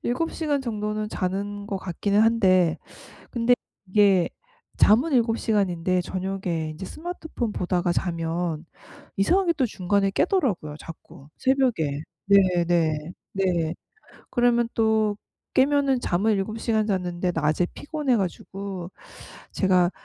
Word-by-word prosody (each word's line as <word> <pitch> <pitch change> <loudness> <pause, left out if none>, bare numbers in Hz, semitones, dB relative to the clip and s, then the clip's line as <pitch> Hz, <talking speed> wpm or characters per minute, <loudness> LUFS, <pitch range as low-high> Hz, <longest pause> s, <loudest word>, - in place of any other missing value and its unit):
7 290 +8 -1
시간 295 -3 -1
정도는 215 -3 -3
자는 200 +2 -3
것 200 - -3
같기는 200 +3 0
한데 185 -7 +4 0.5
근데 240 +1 +3 0.3
이게 190 -2 +4 0.5
잠은 250 +10 +4
7 230 -3 +2
시간인데 185 -4 +1
저녁에 185 -4 -3
인제 155 +5 -8
스마트폰 320 - -5
보다가 175 -1 0
자면 165 -2 -2 0.5
이상하게 350 - +3
또 260 - +2
중간에 195 -1 0
깨더라고요 200 - 0
자꾸 155 -4 -12
새벽에. 235 - +1 0.2
네 185 -3 +4
네. 160 -2 0 0.2
네. 175 -4 0 0.6
그러면 240 -1 +2
또 220 -2 +2 0.4
깨면은 275 -1 +3
잠을 205 +1 +1
7 215 +3 -3
시간 220 -2 +1
잤는데 180 -3 -1
낮에 155 +2 +1
피곤해 290 -4 -1
가지고 190 -1 -4 0.6
제가 185 -2 +3
195 Hz, 245 characters per minute, -25 LUFS, 175-230 Hz, 0.6 s, 한데